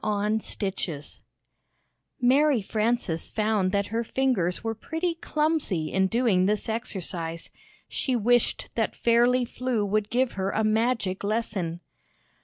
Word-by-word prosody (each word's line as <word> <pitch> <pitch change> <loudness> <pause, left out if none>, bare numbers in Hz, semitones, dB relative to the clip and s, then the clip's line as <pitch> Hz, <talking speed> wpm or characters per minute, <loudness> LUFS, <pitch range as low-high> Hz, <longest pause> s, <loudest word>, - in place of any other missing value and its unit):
See - - -8 0.5
Page 195 -2 -2
148 150 -3 -8 1.1
ARY 285 -3 +4
FRANCES 215 -6 -1
found 210 -3 +1
that 200 0 +1
her 230 +1 +1
fingers 230 -9 0
were 225 0 -1
pretty 325 +10 -2
clumsy 305 - -1
in 190 0 +3
doing 205 -4 +2
this 210 0 0
exercise. 180 -7 -4 0.4
She 260 - -1
wished 240 +1 +2
that 225 -2 -1
Fairly 240 +2 +3
Flew 245 -3 -1
would 210 +1 0
give 250 +1 +1
her 190 0 -2
a 220 - 0
magic 215 -3 +1
lesson. 200 -6 -2
220 Hz, 130 wpm, -26 LUFS, 190-245 Hz, 1.1 s, ARY